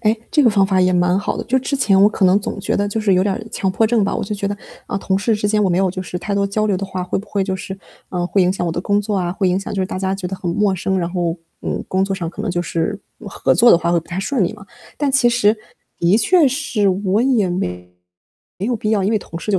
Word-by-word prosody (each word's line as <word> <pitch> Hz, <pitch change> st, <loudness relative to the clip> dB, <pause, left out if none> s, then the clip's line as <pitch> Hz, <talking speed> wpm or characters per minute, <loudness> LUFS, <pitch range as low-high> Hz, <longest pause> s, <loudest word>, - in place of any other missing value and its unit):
哎， 215 Hz, -1 st, +3 dB, 0.2 s
这 300 Hz, -, +4 dB
个 235 Hz, -, +6 dB
方 200 Hz, -2 st, +3 dB
法 190 Hz, -1 st, +2 dB
也 185 Hz, 0 st, +3 dB
蛮 180 Hz, +1 st, +2 dB
好 205 Hz, -, -2 dB
的。 -, -, -3 dB
就 255 Hz, -, +1 dB
是 -, -, +2 dB
之 280 Hz, -, -1 dB
前 205 Hz, -8 st, +3 dB
我 200 Hz, -, +7 dB
可 210 Hz, -2 st, 0 dB
能 185 Hz, +2 st, +4 dB
总 200 Hz, -, -5 dB
觉 190 Hz, -, -1 dB
得 205 Hz, -, 0 dB
就 205 Hz, +2 st, -2 dB
是 205 Hz, -3 st, +3 dB
有 185 Hz, -, +3 dB
点 195 Hz, 0 st, 0 dB
儿 -, -, -6 dB
强 190 Hz, -, -1 dB
迫 220 Hz, +4 st, +2 dB
症 220 Hz, -2 st, +2 dB
吧， 195 Hz, -, -1 dB
我 -, -, -2 dB
就 210 Hz, -, -3 dB
觉 200 Hz, 0 st, -3 dB
得， 205 Hz, +1 st, -2 dB, 0.3 s
嗯， 200 Hz, -, -2 dB
同 190 Hz, 0 st, 0 dB
事 220 Hz, +3 st, +1 dB
之 210 Hz, 0 st, -1 dB
间 210 Hz, 0 st, +2 dB
我 190 Hz, -, +2 dB
没 175 Hz, -, +1 dB
有 190 Hz, -1 st, +2 dB
就 185 Hz, +1 st, -5 dB
是 180 Hz, -1 st, -5 dB
太 200 Hz, +3 st, -3 dB
多 200 Hz, 0 st, +1 dB
交 215 Hz, +2 st, 0 dB
流 200 Hz, -3 st, +1 dB
的 195 Hz, -, -3 dB
话， 190 Hz, -1 st, -4 dB
会 180 Hz, -, -2 dB
不 200 Hz, -, -8 dB
会 200 Hz, -1 st, 0 dB
就 190 Hz, -1 st, -2 dB
是， 190 Hz, +1 st, -7 dB, 0.3 s
嗯， 175 Hz, -1 st, -1 dB
会 195 Hz, +1 st, +2 dB
影 180 Hz, +1 st, +2 dB
响 180 Hz, -2 st, -3 dB
我 -, -, 0 dB
的 170 Hz, -, -2 dB
工 205 Hz, +3 st, +1 dB
作 205 Hz, 0 st, -2 dB
啊， 175 Hz, -2 st, -1 dB
会 190 Hz, 0 st, 0 dB
影 180 Hz, +1 st, +1 dB
响 195 Hz, -, -6 dB
就 195 Hz, -, -1 dB
是 185 Hz, -, 0 dB
大 185 Hz, -, -5 dB
家 190 Hz, 0 st, -1 dB
觉 195 Hz, -2 st, -5 dB
得 190 Hz, +1 st, -5 dB
很 180 Hz, -2 st, -3 dB
陌 200 Hz, +2 st, +1 dB
生， 190 Hz, +1 st, -1 dB
然 170 Hz, -1 st, -2 dB
后， 175 Hz, -2 st, -1 dB, 0.3 s
嗯， -, -, -3 dB
工 190 Hz, +1 st, +1 dB
作 195 Hz, 0 st, -2 dB
上 175 Hz, -3 st, -4 dB
可 180 Hz, +5 st, -7 dB
能 215 Hz, -, -2 dB
就 175 Hz, 0 st, -1 dB
是， 175 Hz, +4 st, -2 dB, 0.2 s
嗯， 220 Hz, -, -8 dB
合 -, -, +1 dB
作 240 Hz, +1 st, +6 dB
的 -, -, +6 dB
话 170 Hz, 0 st, -1 dB
会 175 Hz, -, +3 dB
不 165 Hz, -, -21 dB
太 180 Hz, +3 st, -3 dB
顺 240 Hz, 0 st, 0 dB
利 -, -, -2 dB
嘛。 200 Hz, -, -13 dB, 0.3 s
但 290 Hz, -2 st, +1 dB
其 265 Hz, -2 st, +3 dB
实， 225 Hz, -2 st, +3 dB, 0.4 s
的 175 Hz, +6 st, +3 dB
确 335 Hz, +7 st, +4 dB
是 250 Hz, -7 st, 0 dB
我 195 Hz, +3 st, +1 dB
也 245 Hz, -8 st, +2 dB
没 90 Hz, -, -3 dB, 0.7 s
有 230 Hz, +6 st, -1 dB
必 215 Hz, 0 st, -2 dB
要， 210 Hz, -3 st, +2 dB
因 195 Hz, -, +1 dB
为 220 Hz, -, +2 dB
同 165 Hz, -3 st, -8 dB
事 210 Hz, -, -4 dB
就 195 Hz, -, +2 dB
195 Hz, 345 characters per minute, -19 LUFS, 185-210 Hz, 0.7 s, 我